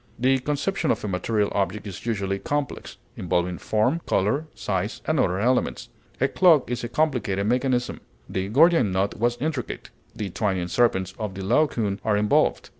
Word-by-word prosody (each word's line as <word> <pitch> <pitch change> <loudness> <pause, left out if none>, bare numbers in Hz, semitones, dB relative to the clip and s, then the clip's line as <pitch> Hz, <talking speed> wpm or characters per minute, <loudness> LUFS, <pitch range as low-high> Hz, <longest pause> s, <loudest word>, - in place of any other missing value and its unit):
The 130 +2 +2
conception 150 +6 -1
of - - 0
a - - -2
material 105 +2 0
object 100 +1 -1
is 100 +3 -8
usually 100 -3 -1
complex, 145 +2 -3 0.2
involving 90 0 -1
form, 125 +10 +1
color, 110 +11 +1
size, - - -2
and - - +1
other 90 - +2
elements; 125 +5 0 0.3
a 135 - +3
clock 160 -6 +4
is 125 0 -2
a 120 - -3
complicated 120 -10 0
mechanism; 125 +1 0 0.3
the 95 0 -3
Gordian 150 - +4
knot 95 +2 -1
was 120 +1 +1
intricate; 145 -4 -4 0.2
the 100 -3 -4
twining 95 -3 -1
serpents 95 -5 +1
of 105 -3 -4
the 95 - -5
Laocoon 105 -4 +1
are 105 -2 +2
involved. 105 0 +2
110 Hz, 165 wpm, -24 LUFS, 100-135 Hz, 0.3 s, clock